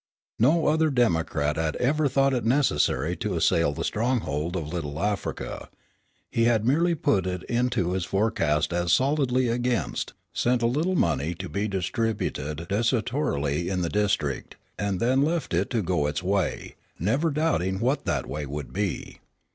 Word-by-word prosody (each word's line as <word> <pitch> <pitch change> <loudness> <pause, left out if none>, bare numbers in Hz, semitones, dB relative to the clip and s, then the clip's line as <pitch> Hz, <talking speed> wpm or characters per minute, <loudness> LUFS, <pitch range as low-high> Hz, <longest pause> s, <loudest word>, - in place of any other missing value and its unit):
No 155 +9 +4
other 160 +1 +3
Democrat 80 - +1
had 80 -1 -1
ever 145 +4 +2
thought 135 0 +2
it 125 - 0
necessary 90 - +2
to - - -2
assail 85 -3 +3
the 70 - -4
stronghold 90 - -1
of 80 -1 -5
Little 75 -4 -4
Africa. 100 +2 -3 0.6
He 115 - +2
had 115 -2 +2
merely 165 +7 +3
put 95 - +1
it 90 -1 -3
into 120 -7 0
his 95 -1 -1
forecast 85 -6 +1
as 85 0 0
"solidly 130 - +2
against," 120 - -1 0.2
sent 120 0 +1
a - - +4
little 155 +10 +1
money 80 - +1
to 95 +3 -6
be 100 +2 -2
distributed 95 -5 -2
desultorily 105 - 0
in 90 -2 -1
the 85 - -1
district, 100 -10 -1 0.2
and 100 -2 -1
then 130 +5 +2
left 160 - 0
it 90 +4 +1
to 115 -4 0
go 85 -5 +1
its 75 +3 -3
way, 95 -2 -1 0.2
never 135 - +1
doubting 140 - 0
what 130 +6 0
that - - 0
way 75 -1 -4
would 70 0 -6
be. 100 -2 -3
100 Hz, 160 wpm, -26 LUFS, 85-125 Hz, 0.6 s, No